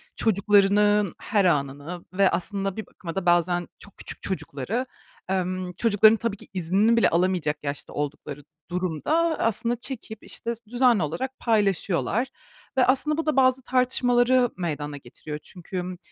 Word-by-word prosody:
çocuklarının 205 -1 +3
her 205 -3 +1
anını 145 +2 -1
ve 195 0 +4
aslında 195 +2 -2
bir 220 - -4
bakıma 165 -3 -8
da 195 -2 -2
bazen 175 0 +2
çok 200 - -15
küçük - - -7
çocukları, 185 - -3 0.4
emm, 185 -1 -2
çocukların 215 +2 +5
tabii 230 -3 -2
ki - - -15
iznini 195 +6 +2
bile - - +5
alamayacak 175 -3 +1
yaşta 140 0 -5
oldukları 145 0 -5 0.3
durumda 185 - 0
aslında 230 +2 0
çekip, 225 -3 -6
işte, 235 0 -3
sü 230 - -12
düzenli 240 -6 +3
olarak 255 - -4
paylaşıyorlar. 205 +1 +1 0.5
Ve 255 - +5
aslında 295 +4 +2
bu 325 - -1
da 310 -3 +1
bazı 260 0 +4
tartışmaları 250 -1 +3
meydana 150 -4 -3
getiriyor 150 +4 -8
çünkü, 180 +1 -7
ımm, 180 0 -5
195 Hz, 145 wpm, -25 LUFS, 175-235 Hz, 0.5 s, çocukların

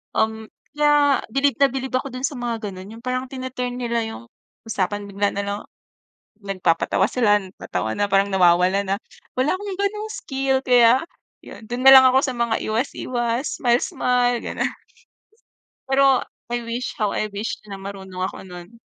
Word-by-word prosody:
Um, 220 0 0 0.3
kaya 295 -2 +3
bilib 275 -2 +2
na 275 - +6
bilib 265 -1 -4
ako 260 0 -2
dun 255 +1 -2
sa 285 - -7
mga 230 -3 -3
gano'n, 190 +4 -10
yung 230 - -15
parang 255 +1 -1
tine-turn 255 -1 -4
nila 235 -1 -1
yung 170 - -8 0.4
usapan, 205 0 -2
bigla 200 +1 0
nalang 200 +1 -3 0.8
nagpapatawa 190 -1 +1
sila, 215 -4 +3
nagtatawa 185 - -4
na, 205 - 0
parang 195 +1 +3
nawawala 180 +1 +4
na. 195 +1 0 0.4
Wala 265 +7 +2
akong 395 0 -5
gano'ng 420 +2 -2
skill 270 -1 -1
kaya 245 +2 +5 0.4
yun, - - -11
dun 245 +1 -3
nalang 265 -1 +10
ako 265 +1 +4
sa 260 - -2
mga 235 -1 0
iwas-iwas, 240 +2 -2
smile-smile, 245 0 +2
gano'n. - - -2 1.2
Pero, 270 -1 +4 0.3
I 240 - -1
wish, 235 +2 -3
how 210 -2 +1
I 215 - -1
wish 205 +3 -4
na 195 - -6
marunong 190 -2 -6
ako - - -6
nun. 180 +5 -11
235 Hz, 155 wpm, -22 LUFS, 200-260 Hz, 1.2 s, nalang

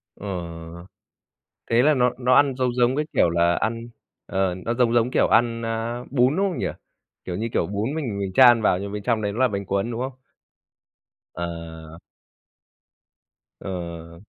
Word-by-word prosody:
Ờ. 100 - -9 1.4
Thế 115 +2 +4
là 150 +1 +4
nó 125 -1 +3
nó 125 0 +3
ăn 140 -2 +4
giống 125 -2 0
giống 125 +2 +2
cái 150 - 0
kiểu 85 - +3
là 85 +1 +2
ăn 115 +1 -2 0.4
ờ, 95 -2 0
nó 115 - -1
giống 120 -1 +2
giống 120 +1 +3
kiểu - - +3
ăn, 115 0 +2
a, 115 +2 -3
bún, 130 +2 +2
đúng 195 +1 +2
không 175 - -5
nhỉ? - - -1 0.6
Kiểu 90 - -4
như, 115 +4 -2
kiểu, 80 - +1
bún 105 +8 -2
mình 120 -11 -3
mình 95 -1 -3
chan 120 -1 +7
vào 90 - +3
nhưng 100 +1 -6
bên 105 -1 -5
trong 115 0 0
đấy 100 -1 -1
nó 115 - -6
là 130 -1 +4
bánh 100 -2 -4
cuốn, 100 +4 -1
đúng 115 - -4
không? 130 +1 -3 1.2
Ờ. 80 -2 -7 1.6
Ờ. 85 -2 -7
115 Hz, 180 wpm, -23 LUFS, 95-125 Hz, 1.6 s, chan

